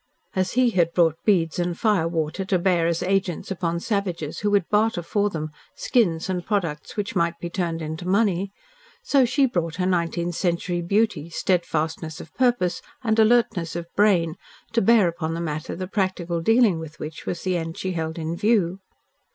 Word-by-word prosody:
As 185 Hz, -1 st, 0 dB
he 250 Hz, 0 st, +3 dB
had 170 Hz, -4 st, +2 dB
brought 165 Hz, -3 st, +2 dB
beads 175 Hz, -6 st, +2 dB
and 175 Hz, -1 st, -1 dB
firewater 165 Hz, -4 st, 0 dB
to 190 Hz, 0 st, +2 dB
bear 175 Hz, -2 st, +2 dB
as 170 Hz, 0 st, 0 dB
agents 190 Hz, -2 st, -1 dB
upon 170 Hz, -2 st, -1 dB
savages 180 Hz, -7 st, -2 dB
who 205 Hz, -, 0 dB
would 200 Hz, -4 st, +2 dB
barter 210 Hz, -3 st, +1 dB
for 205 Hz, +4 st, +1 dB
them 155 Hz, -4 st, -4 dB, 0.2 s
skins 175 Hz, -10 st, +1 dB
and 180 Hz, -2 st, -2 dB
products 170 Hz, -7 st, -2 dB
which 210 Hz, +2 st, -3 dB
might 170 Hz, -1 st, +1 dB
be 170 Hz, 0 st, -5 dB
turned 170 Hz, -3 st, -2 dB
into 160 Hz, +3 st, -5 dB
money, 195 Hz, -1 st, +1 dB, 0.5 s
so 275 Hz, -3 st, +4 dB
she 275 Hz, +3 st, +3 dB
brought 170 Hz, -9 st, -1 dB
her 180 Hz, +1 st, -1 dB
nineteenth 175 Hz, -1 st, 0 dB
century 175 Hz, 0 st, -1 dB
beauty, 180 Hz, -3 st, 0 dB
steadfastness 160 Hz, -2 st, -1 dB
of 160 Hz, -, -11 dB
purpose 245 Hz, -9 st, +1 dB, 0.2 s
and 220 Hz, -2 st, +1 dB
alertness 220 Hz, -7 st, +3 dB
of 170 Hz, -1 st, -3 dB
brain 180 Hz, -5 st, +3 dB, 0.4 s
to 230 Hz, -, +3 dB
bear 220 Hz, -2 st, +5 dB
upon 165 Hz, -1 st, -3 dB
the -, -, -3 dB
matter 155 Hz, -2 st, -4 dB
the 185 Hz, +2 st, -4 dB
practical 185 Hz, -3 st, -1 dB
dealing 225 Hz, -2 st, +4 dB
with 155 Hz, -1 st, -9 dB
which 155 Hz, +1 st, -7 dB
was 170 Hz, -, -3 dB
the 185 Hz, -1 st, 0 dB
end 165 Hz, -1 st, -3 dB
she 190 Hz, -, -2 dB
held 160 Hz, -2 st, -3 dB
in 165 Hz, 0 st, -3 dB
view. 195 Hz, -2 st, +1 dB
175 Hz, 180 wpm, -24 LUFS, 165-205 Hz, 0.5 s, bear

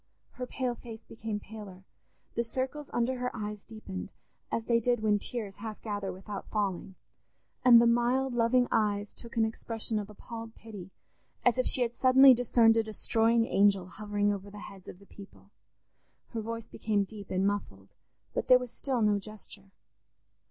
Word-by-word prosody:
Her 250 Hz, 0 st, -6 dB
pale 250 Hz, -1 st, -2 dB
face 230 Hz, -1 st, -10 dB
became 220 Hz, -2 st, -5 dB
paler; 200 Hz, -3 st, -10 dB, 0.5 s
the 235 Hz, -, 0 dB
circles 265 Hz, +5 st, -4 dB
under 245 Hz, +2 st, 0 dB
her 250 Hz, 0 st, -1 dB
eyes 210 Hz, -2 st, -5 dB
deepened, 215 Hz, -, -7 dB, 0.4 s
as 225 Hz, -, -1 dB
they 235 Hz, -1 st, +3 dB
did 240 Hz, 0 st, +1 dB
when 210 Hz, -1 st, +3 dB
tears 210 Hz, -3 st, -5 dB
half 215 Hz, 0 st, -6 dB
gather 205 Hz, -3 st, -3 dB
without 195 Hz, +2 st, -7 dB
falling; 195 Hz, -3 st, -2 dB, 0.7 s
and 245 Hz, -2 st, +9 dB
the 235 Hz, -, +5 dB
mild 240 Hz, +3 st, +2 dB
loving 240 Hz, +1 st, +3 dB
eyes 205 Hz, -1 st, +1 dB
took 235 Hz, -1 st, -10 dB
an 225 Hz, -, +4 dB
expression 220 Hz, 0 st, -2 dB
of 205 Hz, 0 st, -6 dB
appalled 225 Hz, +2 st, -9 dB
pity, 205 Hz, -5 st, -10 dB, 0.6 s
as 245 Hz, +1 st, +4 dB
if 255 Hz, -, +2 dB
she 255 Hz, -, +3 dB
had 235 Hz, -1 st, -2 dB
suddenly 260 Hz, +1 st, +7 dB
discerned 230 Hz, -2 st, +4 dB
a 225 Hz, -, +3 dB
destroying 225 Hz, +1 st, +2 dB
angel 195 Hz, -3 st, +3 dB
hovering 205 Hz, +2 st, -1 dB
over 200 Hz, 0 st, -7 dB
the 205 Hz, -, -11 dB
heads 195 Hz, -3 st, -11 dB
of -, -, -9 dB
the 200 Hz, -, -18 dB
people. 200 Hz, 0 st, -15 dB, 0.8 s
Her 230 Hz, -, -4 dB
voice 230 Hz, 0 st, -5 dB
became 210 Hz, -2 st, 0 dB
deep 200 Hz, 0 st, -10 dB
and 185 Hz, +1 st, +1 dB
muffled, 100 Hz, -, -3 dB, 0.4 s
but -, -, -2 dB
there 255 Hz, -, +8 dB
was 250 Hz, -2 st, -6 dB
still 250 Hz, -2 st, -1 dB
no 205 Hz, -1 st, +3 dB
gesture. 205 Hz, -1 st, -11 dB
220 Hz, 175 wpm, -30 LUFS, 205-235 Hz, 0.8 s, and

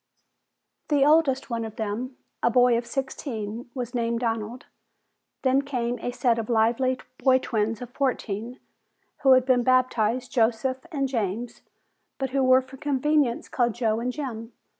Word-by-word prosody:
The 285 Hz, -2 st, +4 dB
oldest 295 Hz, -4 st, +3 dB
one 230 Hz, -1 st, -1 dB
of 220 Hz, -1 st, -7 dB
them, 230 Hz, +4 st, -4 dB, 0.2 s
a -, -, +3 dB
boy 245 Hz, 0 st, +4 dB
of 235 Hz, 0 st, -2 dB
sixteen, 240 Hz, -4 st, -4 dB
was 245 Hz, -1 st, -4 dB
named 235 Hz, -1 st, -1 dB
Donald. 225 Hz, +1 st, -3 dB, 0.8 s
Then 265 Hz, +1 st, +3 dB
came 245 Hz, -4 st, -2 dB
a 245 Hz, -, -3 dB
set 240 Hz, -2 st, +1 dB
of 225 Hz, -, -5 dB
lively 240 Hz, +3 st, +2 dB, 0.2 s
boy 260 Hz, -1 st, +5 dB
twins 225 Hz, -2 st, -2 dB
of 245 Hz, -, -10 dB
fourteen, 245 Hz, -3 st, -2 dB, 0.6 s
who 270 Hz, -2 st, +6 dB
had 255 Hz, -1 st, +4 dB
been 255 Hz, -2 st, +3 dB
baptized 250 Hz, -1 st, +1 dB
"Joseph" 250 Hz, +5 st, 0 dB
and 275 Hz, -4 st, 0 dB
"James", 230 Hz, -1 st, -3 dB, 0.6 s
but 265 Hz, -1 st, -3 dB
who 275 Hz, +1 st, +1 dB
were 255 Hz, 0 st, +5 dB
for 260 Hz, +1 st, -13 dB
convenience 285 Hz, -2 st, +1 dB
called 240 Hz, -3 st, 0 dB
Joe 225 Hz, -2 st, 0 dB
and 245 Hz, +2 st, -2 dB
Jim. 240 Hz, -5 st, -6 dB
245 Hz, 155 wpm, -25 LUFS, 230-260 Hz, 0.8 s, who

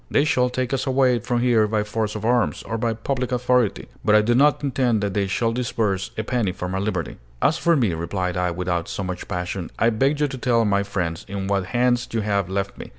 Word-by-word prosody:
They 145 Hz, -, +3 dB
shall 125 Hz, -4 st, +2 dB
take 130 Hz, +1 st, -2 dB
us 135 Hz, +1 st, -1 dB
away 130 Hz, -2 st, +3 dB
from 120 Hz, +2 st, -1 dB
here 115 Hz, -3 st, +3 dB
by 105 Hz, 0 st, 0 dB
force 105 Hz, 0 st, -2 dB
of 105 Hz, -, -4 dB
arms, 120 Hz, -1 st, +1 dB
or 115 Hz, -, -4 dB
by 115 Hz, -1 st, 0 dB
public 125 Hz, +2 st, -2 dB
authority, 125 Hz, -3 st, +1 dB, 0.2 s
but 105 Hz, -, +4 dB
I 105 Hz, -, +7 dB
do 120 Hz, +3 st, +2 dB
not 145 Hz, +3 st, +3 dB
intend 125 Hz, -5 st, +1 dB
that 100 Hz, -1 st, -1 dB
they 100 Hz, -1 st, 0 dB
shall 115 Hz, +4 st, 0 dB
disburse 110 Hz, -5 st, -1 dB
a 110 Hz, -, -1 dB
penny 115 Hz, -4 st, 0 dB
for 90 Hz, -, -5 dB
my 95 Hz, +1 st, -2 dB
liberty." 95 Hz, -, -3 dB, 0.2 s
"As 160 Hz, -, +2 dB
for 170 Hz, 0 st, +3 dB
me," 115 Hz, -, +2 dB
replied 90 Hz, +2 st, -2 dB
I, 90 Hz, 0 st, 0 dB
without 85 Hz, 0 st, -2 dB
so 95 Hz, -, -3 dB
much 90 Hz, -1 st, -5 dB
passion, 90 Hz, 0 st, -4 dB
"I 115 Hz, -, +3 dB
beg 135 Hz, +6 st, +1 dB
you 150 Hz, -, +2 dB
to 135 Hz, -, -6 dB
tell 120 Hz, -2 st, +2 dB
my 100 Hz, -1 st, +2 dB
friends 95 Hz, -2 st, -3 dB
in 100 Hz, 0 st, -3 dB
what 100 Hz, -1 st, 0 dB
hands 120 Hz, +3 st, +1 dB
you 115 Hz, -, 0 dB
have 100 Hz, -3 st, 0 dB
left 100 Hz, +1 st, -3 dB
me. -, -, -8 dB
110 Hz, 240 wpm, -23 LUFS, 95-125 Hz, 0.2 s, I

